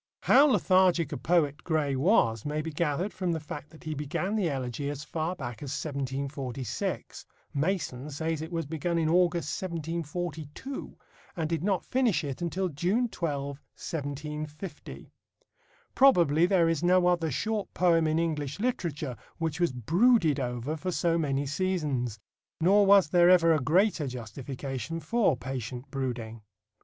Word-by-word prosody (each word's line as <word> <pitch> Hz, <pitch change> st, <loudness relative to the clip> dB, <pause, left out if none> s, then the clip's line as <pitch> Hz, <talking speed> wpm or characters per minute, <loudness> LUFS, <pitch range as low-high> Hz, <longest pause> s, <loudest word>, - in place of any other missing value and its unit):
How 285 Hz, +2 st, +6 dB
lethargic 185 Hz, -, +3 dB
a -, -, -3 dB
poet 155 Hz, -4 st, +1 dB
Gray 155 Hz, -4 st, 0 dB
was 130 Hz, -, +3 dB
may 150 Hz, +1 st, -2 dB
be 160 Hz, -, -4 dB
gathered 165 Hz, +5 st, -1 dB
from 185 Hz, -2 st, -1 dB
the 160 Hz, -, -2 dB
fact 150 Hz, -1 st, -8 dB
that 160 Hz, -, -16 dB
he 155 Hz, -, -3 dB
began 150 Hz, +8 st, -2 dB
the 195 Hz, -6 st, +1 dB
Elegy 135 Hz, 0 st, -3 dB
as 145 Hz, 0 st, -5 dB
far 160 Hz, +3 st, -3 dB
back 120 Hz, -8 st, -7 dB
as 145 Hz, -, -5 dB
1746 135 Hz, -3 st, -4 dB, 0.3 s
Mason 150 Hz, -4 st, -1 dB
says 160 Hz, +2 st, -2 dB
it 160 Hz, +2 st, -6 dB
was 165 Hz, -2 st, -2 dB
begun 165 Hz, +3 st, -2 dB
in 160 Hz, -1 st, +1 dB
August, 170 Hz, -2 st, +1 dB
1742 170 Hz, -, -5 dB, 0.4 s
and 160 Hz, -2 st, 0 dB
did 165 Hz, 0 st, -2 dB
not 195 Hz, -2 st, 0 dB
finish 250 Hz, -9 st, +1 dB
it 140 Hz, +2 st, -5 dB
until 185 Hz, +2 st, -1 dB
June 185 Hz, -, 0 dB
12, 145 Hz, -8 st, -2 dB
1750. 150 Hz, +3 st, -7 dB, 0.8 s
Probably 175 Hz, -, +5 dB
there 180 Hz, -3 st, +3 dB
is 165 Hz, -2 st, 0 dB
no 180 Hz, +1 st, +4 dB
other 175 Hz, -2 st, +2 dB
short 210 Hz, -, -2 dB
poem 165 Hz, -3 st, +3 dB
in 155 Hz, +1 st, +1 dB
English 150 Hz, -2 st, -2 dB
literature 165 Hz, -, -2 dB, 0.2 s
which 165 Hz, -1 st, -2 dB
was 175 Hz, -4 st, +2 dB
brooded 165 Hz, -, +3 dB
over 125 Hz, +3 st, -3 dB
for 180 Hz, +4 st, -3 dB
so 170 Hz, -1 st, +1 dB
many 140 Hz, -2 st, 0 dB
seasons. 145 Hz, -, -1 dB, 0.4 s
Nor 195 Hz, +4 st, +5 dB
was 200 Hz, -3 st, +7 dB
there 175 Hz, +1 st, +5 dB
ever 170 Hz, -2 st, +6 dB
a 155 Hz, -, +2 dB
greater 165 Hz, +3 st, +2 dB
justification 130 Hz, +4 st, -5 dB
for 215 Hz, -, +1 dB
patient 130 Hz, 0 st, -6 dB
brooding. 120 Hz, -5 st, -4 dB
160 Hz, 150 wpm, -28 LUFS, 140-175 Hz, 0.8 s, was